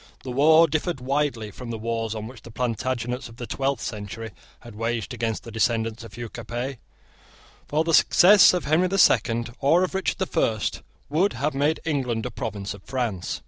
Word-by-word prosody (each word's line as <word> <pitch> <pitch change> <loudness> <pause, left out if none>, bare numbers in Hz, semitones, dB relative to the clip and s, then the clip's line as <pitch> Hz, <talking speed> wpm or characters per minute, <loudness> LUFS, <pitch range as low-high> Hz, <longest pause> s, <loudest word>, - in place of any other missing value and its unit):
The 130 - -5
war 155 +5 +6
differed 155 0 -2
widely 130 -4 -1
from 125 +3 -9
the 115 - -3
wars 115 0 -3
which 110 +2 -7
the 115 - -12
Plantagenets 125 +1 -3
of 115 - -14
the 120 - -6
twelfth 135 0 -2
century 110 +1 -6 0.3
had 120 -2 -12
waged 115 0 -3
against 115 -2 -2
the 115 - -9
descendants 115 +1 0
of 110 -3 -11
Hugh 120 +1 -5
Capet. 120 +3 -5 0.9
For 155 +2 +1
the 165 0 -1
success 190 +5 +7
of 180 - -2
Henry 160 +5 +3
the 195 +2 -1
Second, 120 - +3
or 165 +6 +4
of 185 - -2
Richard 190 0 -1
the 190 - 0
First, 110 - -1 0.3
would 175 +8 +1
have 150 +3 -1
made 145 +4 0
England 125 -8 -1
a - - -4
province 100 -2 -5
of 100 - -12
France. 115 -7 -3
120 Hz, 185 wpm, -24 LUFS, 115-145 Hz, 0.9 s, success